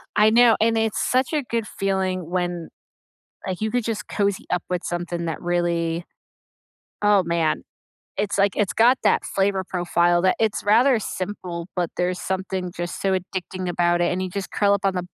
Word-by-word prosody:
I 210 +1 +6
know, 230 0 +6
and 225 0 +3
it's 220 -1 0
such 255 +4 +1
a 300 -2 +1
good 230 -3 -2
feeling 190 -3 -2
when, 175 -2 -2 0.8
like, 185 -2 -3
you 220 0 -1
could 245 0 0
just 215 -5 -3
cozy 200 -2 -1
up 180 - 0
with 180 -1 -1
something 175 -1 -3
that 165 - -3
really 170 -1 -1 1.0
oh 205 -2 +5
man. 170 -2 0 0.6
It's 205 0 -1
like, 200 -1 +3
it's 210 -3 0
got 245 +3 +5
that - - +3
flavor 195 -1 0
profile 175 -1 +1
that 185 - +3
it's 220 -2 0
rather 235 +4 +4
simple, 180 -4 -5
but 175 -3 0
there's 180 0 0
something 190 -1 -3
just 175 0 -5
so 195 - +1
addicting 185 0 -5
about 175 0 +2
it 175 - +2
and 180 +1 -1
you 185 - -3
just 195 +1 -5
curl 200 -1 +3
up 200 - 0
on 195 -1 +1
the 180 - -1
185 Hz, 185 wpm, -23 LUFS, 175-210 Hz, 1.0 s, I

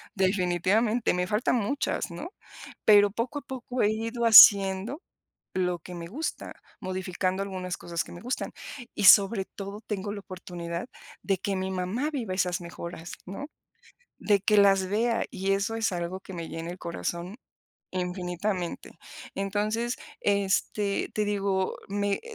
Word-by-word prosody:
definitivamente, 195 +4 +2
me 180 0 -1
faltan 215 +5 +1
muchas, 240 +6 -1
¿no?, - - -6 0.6
pero 205 -1 +7
poco 235 +7 -3
a - - -21
poco 255 -2 -4
he 210 - +4
ido 230 +2 -3
haciendo 205 - +8 0.5
lo 180 -1 0
que 180 - -10
me 170 -1 -6
gusta, 280 - -5 0.3
modificando 185 0 -2
algunas 185 -2 -4
cosas 170 -1 -3
que - - -13
me 175 - -10
gustan 250 +2 -3 0.4
y 205 - -2
sobre 195 +1 +7
todo, 200 +2 -8
tengo 205 -1 -3
la 205 - -6
oportunidad 175 -1 -6 0.4
de 195 - +1
que 195 +1 -2
mi 190 0 -2
mamá 190 +10 -2
viva 235 -11 -3
esas 180 -1 0
mejoras, 170 0 -8
¿no?, 195 +10 -6 0.7
de 205 -2 +2
que 210 +2 +3
las 195 -2 +5
vea. 230 +3 +1
Y 195 +1 -1
eso 200 +3 0
es 225 -3 0
algo 175 +1 -3
que 190 - -11
me 170 -2 -5
llena 165 +1 -5
el 180 - -8
corazón 170 +3 -4 0.5
infinitamente. 180 0 -3 0.4
Entonces, 215 +5 -1 0.2
este, 200 0 0
te 210 - +1
digo 195 -2 0
me 200 0 -1
195 Hz, 150 wpm, -27 LUFS, 180-215 Hz, 0.7 s, haciendo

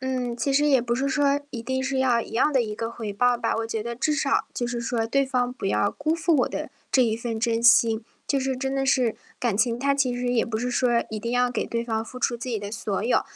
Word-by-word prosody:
嗯， 255 -2 -2
其 275 +3 0
实 290 +2 +3
也 270 -4 +4
不 235 0 -1
是 270 +3 0
说 285 0 +2
一 235 - -6
定 260 +2 -2
是 265 0 -1
要 250 -3 +3
一 - - -8
样 265 +6 +2
的 265 - +3
一 215 -2 -4
个 225 +1 -4
回 225 -3 -5
报 245 +4 +3
吧， 240 - -1
我 225 - -2
觉 225 -1 -3
得 235 +1 -4
至 265 +6 0
少 275 -1 +1
就 240 - -2
是 240 0 -3
说 230 -1 -1
对 275 +4 +2
方 250 -2 0
不 250 - -5
要 200 +1 +2
辜 310 +2 -1
负 335 0 +1
我 255 - +2
的 - - -5 0.2
这 260 - +4
一 220 -1 0
份 230 -1 -4
真 230 0 0
心， 230 -2 +5 0.2
就 275 - +1
是 265 0 -1
真 265 +1 -2
的 270 0 0
是 255 -4 +2 0.2
感 235 -5 0
情 235 +1 +1
它 280 +2 +2
其 265 -3 +1
实 245 0 -1
也 235 - +2
不 220 -1 -3
是 250 +2 -2
说 240 -1 +2
一 215 -1 -5
定 235 - -3
要 245 0 +2
给 - - -2
对 235 0 -2
方 225 -1 -2
付 250 - -9
出 245 -1 0
自 235 +2 -7
己 230 -3 -1
的 205 0 -6
所 210 -2 -2
有， 245 - +2
245 Hz, 300 characters per minute, -25 LUFS, 230-265 Hz, 0.2 s, 心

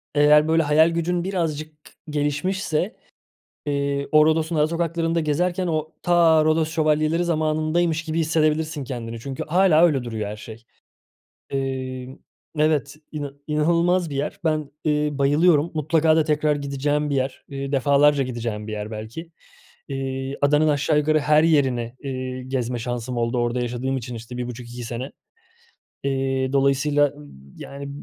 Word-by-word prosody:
eğer, 150 +1 +5
böyle, 160 0 +3
hayal 155 +2 +4
gücün 170 +1 -1
birazcık 155 -5 -2 0.4
gelişmişse, 150 +5 -1 0.7
eee, 140 -1 -1
o 155 0 +6
Rodos'un 160 +1 +1
ara 150 0 +3
sokaklarında 165 0 -1
gezerken 175 +4 0
o 155 -1 -2
ta 165 -3 +4
Rodos 155 0 +2
Şövalyeleri 155 +1 +1
zamanındaymış 155 +1 0
gibi 160 0 -2
hissedebilirsin 155 -1 0
kendini 115 -3 -6
çünkü 135 +3 -5
hâlâ 170 0 +4
öyle 140 -6 +1
duruyor 110 -3 -4
her 105 - -5
şey. 115 +2 -11 0.9
Eee 130 -1 -4 0.4
Evet, 150 -2 +1 0.2
ina 145 -2 -5 0.2
inanılmaz 170 +3 +2
bir 140 - -5
yer. 140 +2 -3
Ben, 155 -3 -1
eee, 150 -1 +1
bayılıyorum, 145 +3 +3
mutlaka 155 +1 +2
da 160 - +4
tekrar 150 0 +1
gideceğim 145 +1 -1
bir 140 - 0
yer, 130 0 -2
eee, 140 0 -5
defalarca 140 +1 +3
gideceğim 115 -4 -4
bir 110 - -5
yer 105 0 -5
belki. 115 +10 -7 0.6
Eee, 135 0 -4
adanın 150 +2 +3
aşağı 150 +1 +2
yukarı 155 +1 +3
her 150 +1 +4
yerini, 130 -7 +2
eee, 130 -1 -4
gezme 125 -2 -2
şansım 120 +1 -4
oldu 120 +1 0
orada 120 +1 0
yaşadığım 125 +2 -2
için, 125 0 -6
işte, 115 +2 -8
1,5-2 120 0 -6
sene. 120 +3 -5 0.9
Eee, 135 -1 -1
dolayısıyla, 140 +1 +3
ııı, 75 - -14 0.3
yani, 140 0 -8
145 Hz, 145 wpm, -23 LUFS, 130-155 Hz, 0.9 s, o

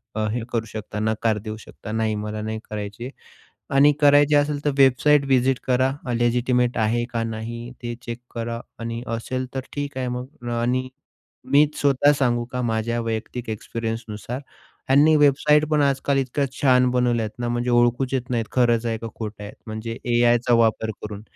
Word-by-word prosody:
अ, 110 -1 0
हे 120 +1 -2
करू 115 -1 0
शकता, 105 -1 -6
नकार 110 0 0
देऊ 110 0 -4
शकता. 105 - -10
नाही 110 -1 0
मला 105 0 -4
नाही 110 +1 -4
करायची. 105 +3 -5 0.6
आणि 140 +2 +6
करायची 145 0 +6
असेल 145 0 +1
तर 145 - +3
वेबसाईट 140 +2 +4
व्हिजिट 130 -1 +2
करा. 130 +1 +2 0.3
लेजिटिमेट 125 +1 +1
आहे 115 +2 +1
का 115 -1 0
नाही? 115 +2 -5
ते 120 0 -3
चेक 120 0 -5 0.2
करा. 115 0 -3 0.2
आणि 115 0 -4 0.2
असेल 130 +3 -3
तर - - 0
ठीक 145 -2 -4
आहे 130 -1 -2
मग. 125 0 -6
आणि 130 +2 0 0.6
मीच 150 +1 +4
स्वतः 145 0 +4
सांगू 120 -3 +1
का 125 - -2
माझ्या 115 0 -1
वैयक्तिक 115 +1 -4
एक्सपिरियन्सनुसार, 115 +2 -5 0.5
ह्यांनी 145 +4 +6
वेबसाईट 150 +1 +4
पण 150 -1 +3
आजकाल 140 0 +1
इतक्या 135 +1 0 0.2
छान 125 -2 +4
बनवल्यात 120 -3 +1
ना 120 - -2
म्हणजे 120 +1 -1
ओळखूच 120 +2 +2
येत 125 -1 -2
नाहीत, 115 -3 0
खरंच 120 -2 +2
आहे 115 -1 -1
का 115 - -6
खोटं 105 -2 -6
आहे? 105 - -7 0.2
म्हणजे 110 +1 -5 0.2
एआयचा 120 0 +3
वापर 110 0 +1
करून. 105 -1 -7
120 Hz, 170 wpm, -23 LUFS, 115-130 Hz, 0.6 s, आणि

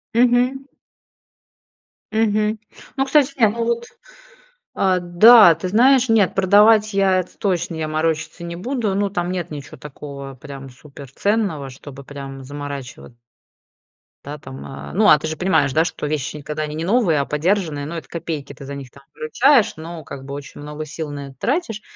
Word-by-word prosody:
Мгм. 250 +3 +3 1.5
Мгм. 215 0 +1 0.4
Ну, 270 - +2
кстати 280 0 +3
не, 225 - +6
ну 230 +3 -2
вот 235 0 -1 0.9
а, 185 -1 +2
да, 175 +2 +7
ты 165 +4 -5
знаешь, 250 +4 +4
нет, 215 -4 +3
продавать 210 +3 +5
я 195 -1 +3
это 180 - -7
точно, 175 -4 -1
я 160 -1 -3
морочиться 155 +2 -2
не 170 0 -6
буду. 225 +2 -2
Ну, 200 0 0
там 175 -2 -2
нет 175 -2 -3
ничё 145 -2 -8
такого 140 -1 -9
прям 135 0 -10
суперценного, 145 - -3
чтобы 140 +1 -11
прям 135 -1 -9
заморачиват 140 -3 -8 1.1
да, 145 +2 -6
там, 135 -2 -10 0.3
ну, 210 +4 +3
а 150 - +8
ты - - -7
же 155 - -3
понимаешь, 160 -6 +1
да, 160 - +4
что 165 - -4
вещи 150 0 -3
когда 150 +1 -4
они 150 0 -5
не 160 - -3
новые, 195 - +2
а 140 - 0
подержанные, 155 -2 -1
ну, 170 - -6
это 165 - -7
копейки 160 -4 -5
ты 140 - -11
за 140 +1 -6
них 135 -3 -9
там 140 - -18
выручаешь, 235 - +3
но 165 0 -8
как 135 -1 -9
бы 140 +1 -6
очень 145 0 -9
много 150 +1 -6
сил 155 0 -6
на 145 -1 -6
это 135 - -13
тратишь. 245 - -1
165 Hz, 170 wpm, -20 LUFS, 145-210 Hz, 1.5 s, а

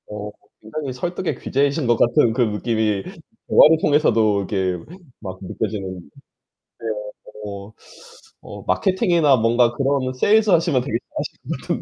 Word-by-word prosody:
어, 105 0 -6 0.3
굉장히 130 +5 -5
설득의 175 +6 -3
귀재이신 140 0 0
것 120 -1 +3
같은 120 -1 +3
그 125 - 0
느낌이 110 -2 0 0.4
대화를 160 +1 +6
통해서도 110 -9 +2
이게 95 -2 -1 0.4
막 95 -2 -8
느껴지는 95 -1 -4 0.8
네. 115 - -6 0.6
어. 100 +1 -8 0.7
어. - - -10
마케팅이나 175 - +2
뭔가 120 +1 +3
그런 135 0 0
세일즈 210 +11 +3
하시면 165 -7 +3
되게 115 -4 -1 0.2
잘하실 - - -5
120 Hz, 280 characters per minute, -21 LUFS, 105-145 Hz, 0.8 s, 대화를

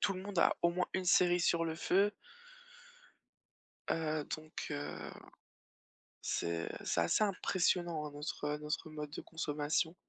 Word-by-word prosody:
tout 205 -2 +2
le 185 - -5
monde 200 -2 -4
a - - +5
au 170 - +5
moins 180 +1 0
une 185 - 0
série 175 0 +5
sur 170 -1 +3
le 160 - -2
feu. 200 +5 +3 1.8
Heu, 155 -2 0
donc, 155 0 -14 0.2
heu, - - -4 1.1
c'est 85 -1 -1 0.2
c'est - - +2
assez 85 - +3
impressionnant 175 -5 +1
hein, - - -6
notre, 145 +1 -4
heu, 150 0 -1
notre 150 +1 -3
mode 150 -1 -5
de - - -5
consommation. 155 +1 -1
160 Hz, 150 wpm, -35 LUFS, 150-180 Hz, 1.8 s, a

